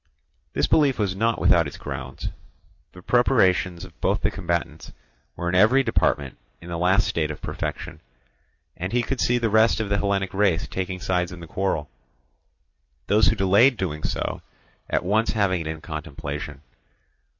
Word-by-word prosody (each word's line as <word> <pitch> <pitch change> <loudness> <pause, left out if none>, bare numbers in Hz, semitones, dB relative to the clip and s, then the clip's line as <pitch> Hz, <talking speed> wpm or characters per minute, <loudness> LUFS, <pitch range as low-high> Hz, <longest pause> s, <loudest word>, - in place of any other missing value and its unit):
This - - +2
belief 140 -4 +3
was 100 -3 -1
not 115 +3 +1
without 85 -3 +4
its 70 - -9
grounds. 65 -2 -6 0.6
The 90 - -14
preparations 95 -8 +2
of 85 - -18
both - - +1
the - - +1
combatants 85 -3 -3 0.4
were 85 - -4
in 90 - -1
every 110 +9 +5
department 75 - 0 0.2
in 85 - -11
the 85 -1 -3
last 95 +3 +3
state 80 -2 -1
of 75 - -6
perfection; - - -5 0.7
and 90 +4 -5
he 120 0 +2
could 135 +1 -2
see 125 - +2
the 115 -3 0
rest 110 +2 +4
of 110 -2 -2
the 100 0 +1
Hellenic 100 -2 -1
race 95 -4 +1
taking 95 0 -4
sides 90 -2 -1
in 90 - -9
the 85 - -9
quarrel; 80 -4 -2 1.2
those 105 +1 +4
who 110 - +3
delayed 105 +6 +4
doing 75 -6 -3
so - - -3 0.5
at - - 0
once 110 +4 +1
having 100 -5 +1
it 80 - -5
in 80 0 -5
contemplation. 75 -3 -6
95 Hz, 170 wpm, -24 LUFS, 85-110 Hz, 1.2 s, every